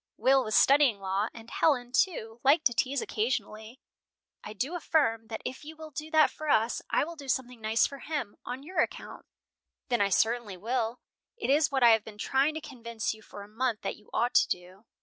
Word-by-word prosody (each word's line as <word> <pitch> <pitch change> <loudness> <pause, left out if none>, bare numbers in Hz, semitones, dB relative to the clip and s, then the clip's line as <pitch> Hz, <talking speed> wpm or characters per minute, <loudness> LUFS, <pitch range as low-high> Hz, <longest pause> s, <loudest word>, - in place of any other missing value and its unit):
Will 270 0 +4
was 215 -2 -1
studying 275 -6 +5
law, 195 +2 -1
and 230 -1 -12
Helen, 250 -6 +1
too, 240 - 0
liked 300 +4 +4
to 240 - +4
tease 270 +3 0
occasionally 220 +1 -3 0.6
"I 210 - -7
do 260 - -3
affirm 255 -10 +1
that 220 -1 -6
if 260 - -5
you 315 +2 -9
will 315 0 -10
do 305 +2 -6
that 315 -1 +4
for 310 0 -6
us, 225 -2 +2
I - - +2
will 335 +3 -6
do 285 -3 -11
something 250 -2 -2
nice 220 +1 +2
for 280 - -6
him, 290 -10 -4
on 250 +2 -6
your 360 +5 -4
account." - - -3 0.6
"Then 240 -4 +1
I 200 - +3
certainly 220 0 +1
will. 230 +3 -2 0.4
It 405 - -1
is 300 +2 +3
what 265 -2 +1
I 235 - +8
have 220 -1 +3
been 215 -2 -11
trying 270 +7 +1
to 315 - -4
convince 235 -6 -4
you 220 - -15
for 205 -1 -11
a - - -12
month 225 +1 -2
that - - -2
you 210 - -21
ought 240 +1 0
to - - +5
do." 180 +4 -6
245 Hz, 215 wpm, -29 LUFS, 220-285 Hz, 0.6 s, I